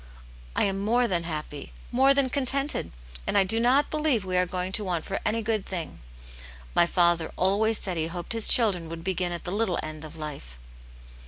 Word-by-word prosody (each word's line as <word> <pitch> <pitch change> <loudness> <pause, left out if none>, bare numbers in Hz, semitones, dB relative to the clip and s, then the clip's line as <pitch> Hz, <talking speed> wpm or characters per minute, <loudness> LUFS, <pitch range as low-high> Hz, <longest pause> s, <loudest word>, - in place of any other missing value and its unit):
I - - +2
am 195 -1 0
more 240 +3 +2
than 175 -5 -1
happy, 150 -3 -6 0.2
more 265 +3 +4
than 270 -2 +2
contented, 275 +2 0 0.4
and - - +1
I 200 - +6
do 220 +4 +2
not 260 +5 +3
believe 300 -9 +1
we 185 -1 -2
are 180 0 +2
going 180 +1 -3
to 210 - +3
want 175 -4 -2
for 195 - -3
any 225 +1 0
good 215 -2 -1
thing. 175 -5 -6 0.7
My 170 - +4
father 170 -2 +2
always 210 +4 +2
said 185 -3 -3
he 160 0 -1
hoped 175 +4 -4
his 225 -2 +4
children 190 -9 +3
would 165 0 -7
begin 180 -1 -1
at 170 - -5
the 175 - -5
little 205 -3 0
end 155 0 -7
of 155 +1 -10
life." 140 - -8
190 Hz, 200 wpm, -26 LUFS, 170-225 Hz, 0.7 s, I